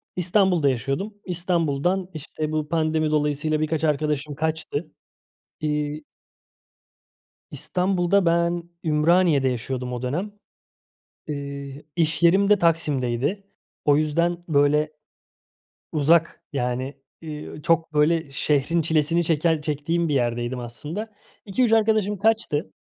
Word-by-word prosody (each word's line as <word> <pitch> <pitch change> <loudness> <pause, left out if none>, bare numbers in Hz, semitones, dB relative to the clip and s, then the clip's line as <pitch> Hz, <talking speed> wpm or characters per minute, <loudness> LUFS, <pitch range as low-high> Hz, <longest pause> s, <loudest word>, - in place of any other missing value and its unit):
İstanbul'da 180 -4 +3
yaşıyordum. 135 - -2
İstanbul'dan, 175 0 0
işte, 155 0 -5
bu 155 -1 -2
pandemi 155 -1 +1
dolayısıyla 150 +1 +1
birkaç 155 0 -1
arkadaşım 150 -1 0
kaçtı. 155 0 -3 0.7
Iıı 150 0 -2 1.5
İstanbul'da 185 +1 +1
ben 170 0 +1 0.2
Ümraniye'de 155 -3 +3
yaşıyordum 125 +1 -3
o 120 - -4
dönem. 165 +12 -2 1.0
Iıı, 140 -1 -6
iş 155 -2 +1
yerim 195 +4 +5
de 210 - +6
Taksim'deydi. 150 - 0 0.4
O 145 -1 +5
yüzden, 170 +3 +1
böyle, 150 0 +3 1.0
uzak, 165 +2 +2
yani, 130 +1 -2 0.3
ııı, 150 -1 -7
çok, 165 0 +1
böyle, 150 0 +2
şehrin 150 +4 +1
çilesini 160 +1 +1
çeken 160 -1 +1
çektiğim 155 +3 -1
bir 145 - +1
yerdeydim 120 0 -1
aslında. 155 - -6 0.3
2-3 220 +4 +1
arkadaşım 215 -2 +2
kaçtı. 215 -8 0
155 Hz, 105 wpm, -24 LUFS, 145-170 Hz, 1.5 s, de